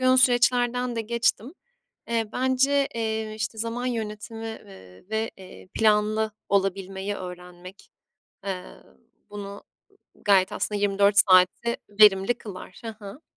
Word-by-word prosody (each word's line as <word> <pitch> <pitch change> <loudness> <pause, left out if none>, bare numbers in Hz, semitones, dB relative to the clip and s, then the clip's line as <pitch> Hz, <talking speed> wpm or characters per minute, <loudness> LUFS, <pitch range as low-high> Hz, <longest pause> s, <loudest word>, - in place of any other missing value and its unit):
yoğun 255 0 +4
süreçlerden 245 -1 +3
de - - 0
geçtim. 235 - -1 0.5
Eee, 230 -1 +1
bence, 270 +2 +2
eee, 220 -1 -2
işte 220 +1 -4
zaman 230 +3 -3
yönetimi, 225 -1 -5 0.2
ııı, 95 -2 -15
ve, 220 +1 -1
eee, 185 -1 -13
planlı 215 0 +2 0.2
olabilmeyi 195 0 -1
öğrenmek, 180 0 -10 0.5
eee, 185 -2 -4 0.7
bunu 200 -1 -8 0.3
g - - -30 0.2
g - - -24
gayet 195 -2 +4
aslında 210 -1 -2
24 200 0 +3
saatte 185 +5 +5 0.2
verimli 200 +2 +6
kılar. 195 -5 -10
Hı - - -4 0.2
hı. 200 +10 -10
215 Hz, 125 wpm, -25 LUFS, 195-235 Hz, 0.7 s, verimli